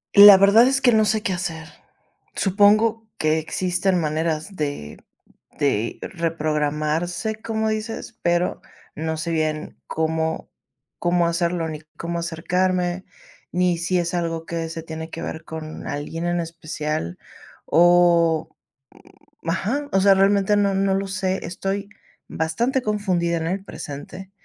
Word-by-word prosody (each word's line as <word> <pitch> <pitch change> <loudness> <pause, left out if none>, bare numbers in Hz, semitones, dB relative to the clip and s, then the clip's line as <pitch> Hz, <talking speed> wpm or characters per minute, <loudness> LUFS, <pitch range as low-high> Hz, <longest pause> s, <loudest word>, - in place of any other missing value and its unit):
La 200 -1 +11
verdad 200 +5 +6
es 270 0 +2
que 255 -2 +4
no 215 0 +4
sé 215 +1 +1
qué 195 - 0
hacer. 165 -3 -4 0.7
Supongo 215 +3 +3
que 155 +1 +2
existen 180 +3 0
maneras 160 +3 -2
de 145 - -4 0.6
de 115 -6 0
reprogramarse, 160 +3 -1
como 220 0 -2
dices, 220 +2 -4
pero 175 +1 +1 0.4
no 160 +1 -3
sé 155 +2 -3
bien 155 -1 -2
cómo 160 0 -2 0.5
cómo 175 0 +2
hacerlo, 170 -1 0
ni 155 -1 -6
cómo 170 0 -4
acercarme, 180 +2 -1 0.5
ni 180 -1 +1
si 175 +1 0
es 170 +1 -2
algo 165 -1 -2
que 165 -1 -3
se 165 0 -6
tiene 160 0 -7
que 165 - -6
ver 160 - -5
con 160 -1 -7
alguien 160 +3 -4
en 175 0 0
especial 155 - -4 0.5
o, 170 -2 +4 0.9
mm, 165 - -4
ajá. 250 +11 -1
O 195 - +3
sea, 195 0 +6
realmente 200 +1 +3
no, 200 -1 +2
no 195 0 +1
lo 195 +1 -1
sé. 190 -1 -2
Estoy 195 +3 -3 0.4
bastante 235 +12 -1
confundida 185 -6 0
en 160 - -3
el 190 +3 -2
presente 180 +2 -8
175 Hz, 135 wpm, -22 LUFS, 160-195 Hz, 0.9 s, La